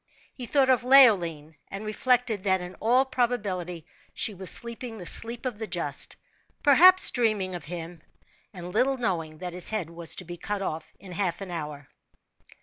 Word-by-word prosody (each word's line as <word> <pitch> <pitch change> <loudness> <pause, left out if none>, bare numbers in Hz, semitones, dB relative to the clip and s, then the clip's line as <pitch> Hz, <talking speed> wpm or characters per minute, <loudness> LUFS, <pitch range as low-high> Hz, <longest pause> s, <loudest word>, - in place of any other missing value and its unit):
He 250 -2 -8
thought 270 -1 +3
of 255 -1 +1
Leoline, 175 - +4
and 200 +2 -8
reflected 230 -1 0
that 190 -2 +1
in 180 0 -8
all 250 +4 +2
probability 200 - -3 0.3
she 215 - 0
was 190 -1 -1
sleeping 235 0 -1
the 180 - -9
sleep 235 +7 +2
of 240 -5 -4
the 220 - -5
just - - 0 0.5
perhaps 355 +6 +7
dreaming 215 -6 0
of 175 -4 -7
him, 170 0 -8 0.5
and 180 -2 -9
little 265 +4 +1
knowing 165 -9 -3
that 180 +1 -7
his 180 -1 0
head 195 -7 -3
was 170 -1 -2
to 180 - -8
be 175 +1 -8
cut 200 +3 -4
off 160 -3 -5
in 190 -2 -12
half 180 -2 -2
an 195 -2 -8
hour. 150 -4 -7
195 Hz, 175 wpm, -26 LUFS, 175-240 Hz, 0.5 s, perhaps